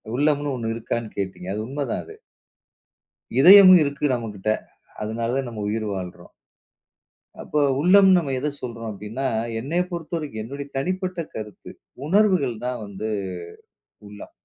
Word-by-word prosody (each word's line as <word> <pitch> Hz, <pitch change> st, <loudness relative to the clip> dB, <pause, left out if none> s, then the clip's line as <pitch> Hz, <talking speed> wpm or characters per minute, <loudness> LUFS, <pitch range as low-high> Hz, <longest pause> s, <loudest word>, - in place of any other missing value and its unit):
உள்ளம்னு 145 Hz, 0 st, +1 dB
ஒண்ணு 115 Hz, -2 st, -3 dB
இருக்கான்னு 115 Hz, -1 st, -4 dB
கேட்டீங்க. 95 Hz, -1 st, -4 dB
அது 110 Hz, +1 st, -3 dB
உண்மைதான் 140 Hz, -2 st, -3 dB
அது. -, -, -12 dB, 1.2 s
இதயம் 190 Hz, +4 st, +10 dB
இருக்கு 145 Hz, +1 st, -2 dB
நமக்கிட்ட. 110 Hz, -4 st, -4 dB, 0.5 s
அதனாலதான் 115 Hz, +4 st, -2 dB
நம்ம 105 Hz, -3 st, -5 dB
உயிர் 110 Hz, +1 st, -2 dB
வாழ்றோம். 90 Hz, -2 st, -7 dB, 1.1 s
அப்போ 150 Hz, -, -1 dB, 0.2 s
உள்ளம்னு 190 Hz, +2 st, +6 dB
நம்ம 145 Hz, -6 st, -1 dB
எதைச் 145 Hz, +1 st, -4 dB
சொல்றோம் 115 Hz, -2 st, -5 dB
அப்படின்னா, 105 Hz, +6 st, -5 dB, 0.3 s
என்னையப் 170 Hz, +8 st, -1 dB
பொறுத்தவரைக்கும் 155 Hz, -9 st, -4 dB
என்னோட 140 Hz, +4 st, -6 dB
தனிப்பட்ட 185 Hz, +4 st, -2 dB, 0.2 s
கருத்து, 105 Hz, -2 st, -8 dB, 0.4 s
உணர்வுகள் 185 Hz, -, +3 dB
தான் 125 Hz, -2 st, -3 dB
வந்து 100 Hz, +2 st, -5 dB, 1.0 s
உள்ளம். 105 Hz, 0 st, -11 dB
125 Hz, 120 wpm, -23 LUFS, 110-155 Hz, 1.2 s, இதயம்